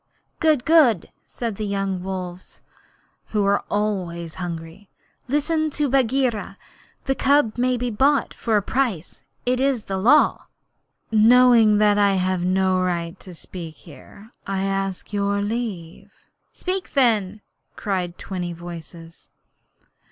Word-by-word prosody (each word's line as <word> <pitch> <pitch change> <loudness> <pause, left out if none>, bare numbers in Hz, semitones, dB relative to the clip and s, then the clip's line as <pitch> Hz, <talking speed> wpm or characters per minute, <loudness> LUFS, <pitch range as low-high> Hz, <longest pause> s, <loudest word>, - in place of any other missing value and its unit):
'Good! 305 -6 +2
good!' 285 - +4 0.2
said 230 -5 -5
the 215 - -4
young 195 -2 -2
wolves, 185 -1 -7 0.6
who 210 -2 0
are 200 0 +2
always 180 -6 -2
hungry. 170 +3 -7 0.4
'Listen 310 +3 0
to 295 0 -1
Bagheera. 250 -6 0 0.5
The 270 - +1
cub 275 -4 +2
can 250 +1 0
be 245 0 -2
bought 275 +6 +2
for 225 -2 0
a 205 - 0
price. 210 - -2 0.2
It 250 +1 +1
is 265 -4 +1
the 195 -1 -3
Law.' 260 +10 +3 0.6
'Knowing 225 -1 +6
that 210 0 +3
I 200 -1 +3
have 185 -1 0
no 185 +1 +1
right 175 0 -2
to 180 -2 -11
speak 165 -1 -8
here, 200 - -15 0.2
I 195 -1 -1
ask 195 0 -3
your 200 0 0
leave.' 205 -6 -4 0.4
'Speak 370 +1 -3
then,' 215 -7 +2 0.3
cried 185 -4 -3
twenty 180 -3 -5
voices. 165 -1 -11
200 Hz, 130 wpm, -22 LUFS, 185-245 Hz, 0.6 s, Knowing